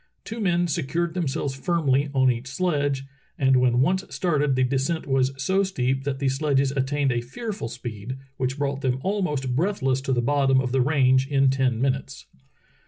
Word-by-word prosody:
Two 225 +1 -6
men 175 -4 +1
secured 170 +2 -1
themselves 145 -5 -2
firmly 140 -2 +1
on 130 -2 +3
each 120 +2 -5
sledge, 145 -2 -1 0.3
and 135 -2 +3
when 125 -1 +3
once 185 +7 +2
started 150 -6 0
the 130 - +2
descent 135 +6 -1
was 135 -1 +1
so 190 +8 +1
steep 135 -8 -1
that 140 -2 -1
the 140 0 -1
sledges 135 0 +1
attained 140 0 0
a 120 -1 0
fearful 205 - -5
speed, 120 0 -6 0.2
which 130 +1 -2
brought 140 -1 -2
them 130 -2 0
almost 150 -11 -1
breathless 135 -6 0
to 135 - -3
thp 120 -2 +1
bottom 135 -1 +3
of 130 -1 -1
the 130 0 +2
range 130 -1 +3
in 135 -2 +3
ten 130 -3 +1
minutes. 130 - -2
135 Hz, 175 wpm, -24 LUFS, 130-150 Hz, 0.3 s, on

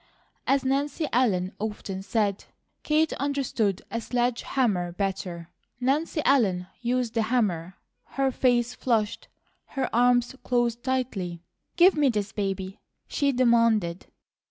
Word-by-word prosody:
As 275 -1 +2
Nancy 280 +4 0
Ellen 195 -7 +2
often 205 -3 -4
said, 200 0 -1 0.4
Kate 310 +1 +2
understood 260 -8 -1
a 230 - -2
sledge 245 +1 0
hammer 200 -10 0
better. 180 -2 -4 0.3
Nancy 295 +5 0
Ellen 195 -10 +3 0.2
used 245 -1 0
the 230 - +1
hammer. 195 -7 0 0.4
Her 270 -1 +2
face 245 -2 +2
flushed, 220 -4 -1 0.5
her 270 - +1
arms 245 +1 +3
closed 240 -1 0
tightly. 210 -11 -2 0.3
"Give 360 +2 +6
me 295 -3 +3
this 210 -4 -1
baby," 195 -1 -3 0.3
she 280 -2 +1
demanded. 230 -8 +2
235 Hz, 120 wpm, -26 LUFS, 195-260 Hz, 0.5 s, Give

